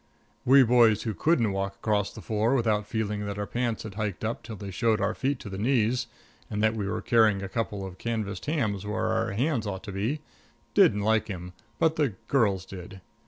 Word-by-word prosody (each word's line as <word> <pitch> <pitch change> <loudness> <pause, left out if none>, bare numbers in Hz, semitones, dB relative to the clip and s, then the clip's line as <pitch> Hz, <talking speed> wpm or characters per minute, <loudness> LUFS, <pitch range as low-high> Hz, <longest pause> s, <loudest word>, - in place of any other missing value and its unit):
We 135 +2 +7
boys 115 -3 +4
who 110 - -2
couldn't 120 -6 +2
walk 95 0 -2
across 105 -2 0
the - - -10
floor 110 +4 +1
without 110 -4 +1
feeling 105 -2 -2
that 100 0 -4
our 105 - -2
pants 120 0 -2
had 110 -3 -7
hiked 105 -1 -3
up 115 - -2
till 110 - -8
they 100 -1 -7
showed 110 +2 +1
our 100 +2 +1
feet 140 +1 -1
to 125 - -8
the 95 - -5
knees, 120 +1 +1 0.4
and 105 0 -2
that 110 0 +4
we 105 -3 -3
were - - -3
carrying 110 -4 +4
a - - -3
couple 105 -1 -3
of 95 -1 -9
canvased 110 -1 -3
hams 115 - 0
where 105 +1 -2
our 110 -1 0
hands 120 0 0
ought 95 -2 -4
to 100 - -6
be, 110 +11 -2 0.5
didn't 105 - +5
like 110 +1 +2
him; 90 -3 -6 0.2
but 160 0 +2
the 140 -10 +1
girls 100 -9 +2
did. 95 0 -10
110 Hz, 210 wpm, -27 LUFS, 100-115 Hz, 0.5 s, We